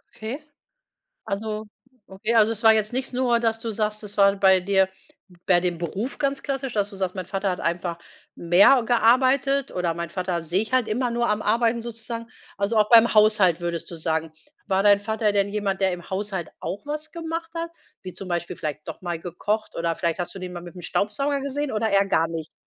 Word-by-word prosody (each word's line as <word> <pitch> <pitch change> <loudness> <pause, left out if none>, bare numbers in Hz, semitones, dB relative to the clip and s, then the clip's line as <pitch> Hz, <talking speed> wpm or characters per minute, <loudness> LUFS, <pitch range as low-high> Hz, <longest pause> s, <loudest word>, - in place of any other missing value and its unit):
Okay. 230 +7 -5 0.9
Also 215 +1 -3 0.4
okay 195 +4 -2
also, 225 0 +5
es 225 +1 -7
war 220 0 +8
jetzt 215 +1 +1
nicht 260 +1 -2
nur, 245 -2 +2
dass 225 -1 +1
du 230 -1 -3
sagst, 215 0 -2
das 205 0 -9
war 200 0 +6
bei 190 -1 +5
dir 190 0 +2 0.6
bei 175 -2 +4
dem 175 -2 -1
Beruf 195 - -4
ganz 275 -1 -1
klassisch, 270 -3 -3
dass 205 0 0
du 195 - -9
sagst: 190 -1 -2
„Mein 185 -2 -4
Vater 195 0 -2
hat 180 - -3
einfach 170 0 -2 0.4
mehr 195 +10 +5
gearbeitet 260 +4 +3
oder 175 -2 -1
meinen 170 -1 -5
Vater 180 -2 -2
sehe 175 +4 0
ich 220 +3 -5
halt 255 -3 +2
immer 245 +3 0
nur 235 0 0
am 210 0 0
Arbeiten, 230 +2 +1
sozusagen." 230 0 -6 0.3
Also, 205 +3 0
auch 210 +1 +3
beim 235 0 +7
Haushalt 210 -5 +4
würdest 170 0 -4
du 170 - -7
sagen. 160 0 -1 0.4
War 195 -1 +1
dein 205 -1 +5
Vater 220 0 0
denn 200 0 +2
jemand, 200 -2 -2
der 190 -1 +2
im 175 +1 -8
Haushalt 190 -2 -3
auch 200 - -5
was 305 +1 -5
gemacht 330 0 -5
hat, 335 0 -3 0.3
wie 185 -1 -7
zum 195 - -8
Beispiel 170 -1 -3
vielleicht 150 0 -5
doch 160 - -7
mal 175 -2 -3
gekocht 205 +6 -3
oder 165 0 -1
vielleicht 170 +1 -1
hast 175 - -4
du - - -7
den 180 -1 -6
mal 175 - -6
mit 175 +1 -11
'nem 180 - -10
Staubsauger 275 - -1
gesehen 280 0 -2
oder 220 +1 0
eher 200 -1 +3
gar 165 -3 +2
nicht? 165 -1 -6
205 Hz, 215 wpm, -24 LUFS, 180-235 Hz, 0.9 s, war